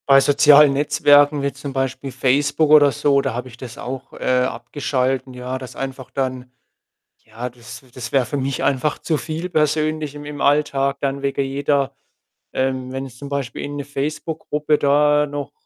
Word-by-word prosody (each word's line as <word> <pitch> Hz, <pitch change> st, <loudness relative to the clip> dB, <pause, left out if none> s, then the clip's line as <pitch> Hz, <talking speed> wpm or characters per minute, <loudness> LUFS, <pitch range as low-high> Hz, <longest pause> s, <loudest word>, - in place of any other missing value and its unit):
Bei 135 Hz, 0 st, +8 dB
sozialen 145 Hz, +1 st, +6 dB
Netzwerken 145 Hz, 0 st, +4 dB
wie 140 Hz, -, 0 dB
zum 140 Hz, 0 st, -7 dB
Beispiel 135 Hz, 0 st, -3 dB
Facebook 145 Hz, +4 st, +1 dB
oder 145 Hz, -2 st, +7 dB
so, 140 Hz, +3 st, +2 dB
da 135 Hz, -3 st, -2 dB
habe 125 Hz, +2 st, -5 dB
ich 120 Hz, -1 st, -13 dB
das 120 Hz, -1 st, -9 dB
auch, 130 Hz, +1 st, -7 dB
äh, 125 Hz, 0 st, +1 dB
abgeschalten, 130 Hz, +1 st, -2 dB
ja, 125 Hz, +1 st, -5 dB
dass 130 Hz, -1 st, -9 dB
einfach 135 Hz, -1 st, -6 dB
dann 130 Hz, -2 st, -3 dB, 0.7 s
ja, 115 Hz, +3 st, -6 dB
das 120 Hz, +1 st, -12 dB
das 125 Hz, -2 st, -7 dB
wäre 135 Hz, -2 st, +2 dB
für 145 Hz, -, -3 dB
mich 135 Hz, 0 st, -2 dB
einfach 140 Hz, +2 st, 0 dB
zu 160 Hz, -, -1 dB
viel 160 Hz, +4 st, -5 dB
persönlich 155 Hz, -2 st, 0 dB
im 145 Hz, 0 st, -9 dB
im 145 Hz, -1 st, -7 dB
Alltag 140 Hz, -1 st, +2 dB
dann 140 Hz, 0 st, -2 dB
wegen 140 Hz, 0 st, 0 dB
jeder 140 Hz, 0 st, 0 dB, 0.6 s
ähm, 130 Hz, -1 st, -1 dB
wenn 135 Hz, +1 st, -4 dB
ich 125 Hz, -1 st, -15 dB
zum 140 Hz, +1 st, -8 dB
Beispiel 140 Hz, -4 st, -4 dB
irgend 145 Hz, 0 st, -5 dB
'ne -, -, -9 dB
Facebook-Gruppe 150 Hz, +1 st, -2 dB
da 150 Hz, +1 st, +3 dB
noch 145 Hz, 0 st, -5 dB
140 Hz, 175 wpm, -20 LUFS, 130-145 Hz, 0.7 s, Bei